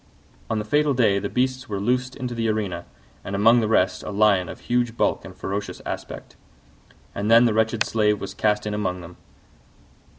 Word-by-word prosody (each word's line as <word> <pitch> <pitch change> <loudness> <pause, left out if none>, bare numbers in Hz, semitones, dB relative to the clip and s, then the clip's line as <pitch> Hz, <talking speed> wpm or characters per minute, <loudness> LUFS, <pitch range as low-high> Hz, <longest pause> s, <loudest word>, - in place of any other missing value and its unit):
On 110 - 0
the 105 - -3
fatal 145 +4 +2
day 105 -5 +3
the 100 0 -4
beasts 130 0 -1
were 100 -2 -3
loosed 125 +4 -1
into 125 -2 -4
the 115 -1 -1
arena, 100 -6 -2 0.4
and 100 - -4
among 115 +4 +5
the 110 - 0
rest 95 -4 +2
a - - -7
Lion 100 -3 +2
of - - -9
huge 120 -1 -1
bulk - - +1
and - - -11
ferocious 100 +1 -4
aspect; - - -7 0.8
and 100 +2 -2
then 115 +1 +7
the 115 - +2
wretched 110 0 +1
Slave 105 -2 +1
was 95 -1 -6
cast 105 +1 0
in 105 - -2
among 95 -3 -2
them. 85 +1 -12
110 Hz, 195 wpm, -23 LUFS, 100-120 Hz, 0.8 s, then